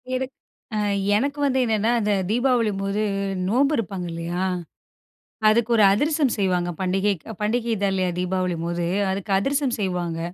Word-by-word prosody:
எனக் 260 +1 -3 0.4
அ - - 0 0.4
எனக்கு 280 +6 0
வந்து 265 -2 +2
என்னன்னா, 220 0 +1
அந்த 210 -1 +1 0.2
தீபாவளிபோது 215 -4 +1 0.5
நோம்பு 275 +8 +2
இருப்பாங்க 190 -4 -3
இல்லையா, 170 +2 -3 1.1
அதுக்கு 230 +2 +2
ஒரு 215 - +5
அதிர்சம் 290 +5 +2
செய்வாங்க, 180 -3 +1
பண்டிகைக்கு. 190 0 0
பண்டிகைதா 220 -1 0
இல்லையா, 185 -1 0
தீபாவளிம்போது. 175 -2 -1 0.2
அதுக்கு 195 +1 -4
அதிர்சம் 275 +3 0
செய்வாங்க. 175 -4 -2
205 Hz, 120 wpm, -23 LUFS, 185-240 Hz, 1.1 s, ஒரு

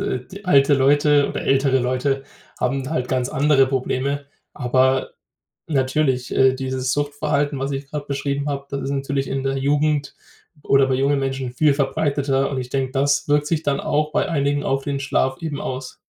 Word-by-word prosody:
halt 185 +11 -5
alte 140 -4 +5
Leute 145 +1 +3
oder - - -4
ältere 135 0 +2
Leute 130 +2 -1 0.3
haben 135 +2 -1
halt 125 -6 -1
ganz 125 -1 -1
andere 140 -1 +3
Probleme. 135 +2 -2 0.3
Aber 130 0 +1 0.6
natürlich, 130 -3 0
äh, 130 0 +4
dieses 130 -1 -2
Suchtverhalten, 145 0 -1
was 135 +1 -2
ich 135 0 -5
gerade 150 -1 -5
beschrieben 140 +1 -2
habe. 140 -1 -3
Das 140 - -3
ist 135 - -3
natürlich 135 0 -2
in 135 0 -2
der 135 0 0
Jugend 145 +1 0 0.5
oder 135 -1 +4
bei 130 - 0
jungen 140 +2 +2
Menschen 135 -2 -3
viel 145 +2 +3
verbreiteter. 140 -1 0
Und 135 - -3
ich 125 -1 -5
denke, 130 -1 -1
das 140 +2 +1
wirkt 145 0 +2
sich 160 0 0
dann 140 -1 0
auch 150 +1 0
bei - - +1
einigen 145 -2 0
auf 135 0 0
den 140 -1 -2
Schlaf 130 -1 0
eben 150 -3 -4
aus. 130 0 -5
140 Hz, 180 wpm, -21 LUFS, 130-145 Hz, 0.6 s, alte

